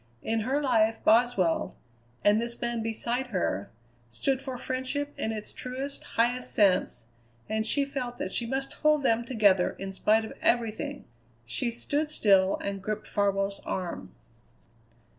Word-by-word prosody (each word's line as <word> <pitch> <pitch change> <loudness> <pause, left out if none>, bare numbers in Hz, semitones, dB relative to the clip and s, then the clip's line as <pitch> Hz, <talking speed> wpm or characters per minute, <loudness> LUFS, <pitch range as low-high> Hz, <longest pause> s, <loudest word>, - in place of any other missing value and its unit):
In 225 0 0
her 260 +6 0
life 225 -5 +2
Boswell, 220 -7 +3 0.5
and 210 +2 +4
this 235 0 -3
man 235 -1 -1
beside 235 +3 -2
her, 175 - -1 0.4
stood 265 - -1
for 265 -2 -5
friendship 260 +3 -3
in 220 - -2
its 215 -1 -5
truest, 265 +3 -5
highest 245 +2 +1
sense, 185 - +2 0.4
and 220 0 -1
she 280 +4 +2
felt 255 -3 -4
that 185 - -3
she 235 - -1
must 270 +2 -3
hold 305 -2 +2
them 235 -2 +2
together 205 -7 +3
in 195 0 -5
spite 215 +3 +2
of - - -8
everything. 240 +5 0 0.4
She 120 - -1
stood 290 +6 -1
still 195 -9 +4
and 200 -1 -3
gripped 215 +2 -4
Farwell's 200 -1 0
arm. 180 -2 -5
230 Hz, 145 wpm, -28 LUFS, 200-255 Hz, 0.5 s, and